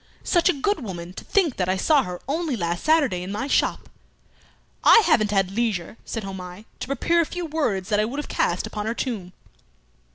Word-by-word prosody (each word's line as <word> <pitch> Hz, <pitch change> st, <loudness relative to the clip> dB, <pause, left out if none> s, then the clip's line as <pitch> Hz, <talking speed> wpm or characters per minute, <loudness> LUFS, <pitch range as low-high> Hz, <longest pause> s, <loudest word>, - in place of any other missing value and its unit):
"Such 345 Hz, 0 st, +3 dB
a -, -, +4 dB
good 315 Hz, +6 st, -1 dB
woman! 180 Hz, -4 st, -6 dB
To -, -, -8 dB
think 350 Hz, -10 st, +1 dB
that 180 Hz, -1 st, 0 dB
I 190 Hz, -, +1 dB
saw 295 Hz, +8 st, +4 dB
her 180 Hz, -4 st, -6 dB
only 310 Hz, -1 st, -1 dB
last 175 Hz, -4 st, -2 dB
Saturday 290 Hz, -, +3 dB
in 185 Hz, +2 st, -5 dB
my 210 Hz, +6 st, -2 dB
shop." 280 Hz, -, +1 dB, 1.0 s
"I 455 Hz, -, +8 dB
haven't 215 Hz, -2 st, +3 dB
had 195 Hz, -2 st, +1 dB
leisure," 215 Hz, -4 st, -1 dB
said 225 Hz, -, -4 dB
Homais, 190 Hz, +1 st, -8 dB
"to -, -, -5 dB
prepare 335 Hz, +6 st, +2 dB
a -, -, 0 dB
few 355 Hz, -1 st, -4 dB
words 240 Hz, -, -1 dB
that 210 Hz, -1 st, +2 dB
I 215 Hz, -, +3 dB
would 245 Hz, +6 st, -5 dB
have 295 Hz, -, -3 dB
cast -, -, 0 dB
upon 210 Hz, 0 st, -4 dB
her 230 Hz, -, -1 dB
tomb." 210 Hz, -10 st, -4 dB
220 Hz, 205 wpm, -24 LUFS, 190-295 Hz, 1.0 s, I